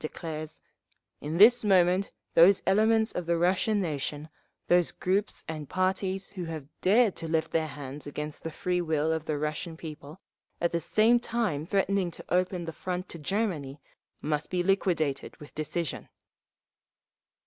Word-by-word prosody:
declares: 155 0 -6 0.6
in 155 +3 -4
this 235 +5 +7
moment 185 -1 +3 0.2
those 185 +4 +6
elements 220 +3 +3
of 180 -2 -4
the 170 0 +2
Russian 190 +5 +2
nation, 150 -3 -3 0.4
those 175 -1 +3
groups 195 +3 -1
and 155 -3 -6
parties 190 +1 -1
who 180 -3 -5
have 160 -3 -6 0.2
dared 215 +2 +4
to 165 - -4
lift 160 0 0
their 160 -1 +1
hands 145 0 -8
against 150 +1 -5
the 165 - -3
free 180 +3 -1
will 160 -2 0
of 160 -1 -3
the 155 -2 -1
Russian 155 +3 -3
people, 155 0 -9 0.4
at 170 - +1
the 170 - -1
same 225 +8 +4
time 215 -11 -2
threatening 195 -1 +1
to 170 - -10
open 180 -1 0
the 165 - -5
front 180 +2 -4
to 170 - -8
Germany, 155 -6 -2 0.4
must 150 0 -1
be 180 -1 0
liquidated 175 -7 0
with 150 - -13
decision! 155 +1 -3
170 Hz, 155 wpm, -28 LUFS, 155-190 Hz, 0.6 s, this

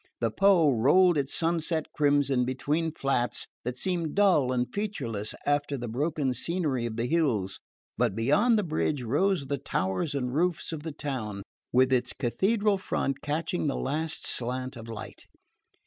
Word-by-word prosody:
The 115 -2 0
Po 180 - +4
rolled 155 +10 +5
its 140 -2 -1
sunset 165 -1 0
crimson 145 -3 +2
between 145 +6 -1
flats 135 -5 -1 0.2
that 125 +1 -4
seemed 170 -3 -1
dull 185 -11 +4
and 125 -1 +1
featureless 130 - -3
after 145 0 +1
the 120 -1 -5
broken 140 +2 -1
scenery 140 -3 -1
of 110 - -5
the 115 +1 -1
hills; 120 - 0 0.4
but - - +2
beyond 200 - +3
the 210 - +1
bridge 155 -4 -1
rose 150 - +1
the 140 0 -2
towers 135 - -1
and 125 -2 -2
roofs 170 +2 0
of 160 -2 -5
the 160 +1 -5
town, 120 -9 -4 0.3
with 130 +1 +4
its 125 -1 +1
cathedral 200 - +1
front 140 -6 -2
catching 160 +2 -1
the 140 - 0
last 155 +3 -2
slant 130 +2 -2
of 115 -1 -9
light. 115 -2 -8
145 Hz, 160 wpm, -28 LUFS, 125-165 Hz, 0.4 s, rolled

